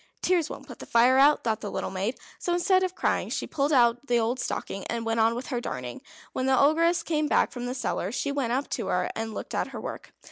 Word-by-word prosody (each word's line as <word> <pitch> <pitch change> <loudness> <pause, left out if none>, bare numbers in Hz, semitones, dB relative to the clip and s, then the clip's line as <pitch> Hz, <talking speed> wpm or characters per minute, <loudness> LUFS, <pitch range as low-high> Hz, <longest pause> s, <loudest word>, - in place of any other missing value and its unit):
"Tears 345 -4 +2
won't 275 - -8
put 245 -4 -11
the - - -9
fire 245 +3 +5
out," 290 +2 +5
thought 220 -3 -1
the 205 - -4
little - - -3
maid. 195 +6 -2 0.2
So 350 - -1
instead 370 +2 +3
of 370 0 -1
crying - - 0
she - - -2
pulled 285 +1 -1
out 245 0 +3
the 240 -1 +3
old 235 +3 0
stocking, 195 -4 -3
and 230 -1 -3
went 225 0 0
on 225 +1 +3
with 245 +2 -5
her 245 -3 -2
darning. 125 - -5 0.3
When 255 - -1
the 265 -1 +4
Ogress 330 +4 +3
came 305 -2 0
back - - +2
from 245 -1 -5
the 250 - -3
cellar 205 -6 -2
she 280 +3 -2
went 275 -5 -1
up 265 +3 0
to - - -2
her - - 0
and 225 -1 -4
looked - - -6
at - - 0
her - - -7
work. - - -7
250 Hz, 255 wpm, -27 LUFS, 230-290 Hz, 0.3 s, fire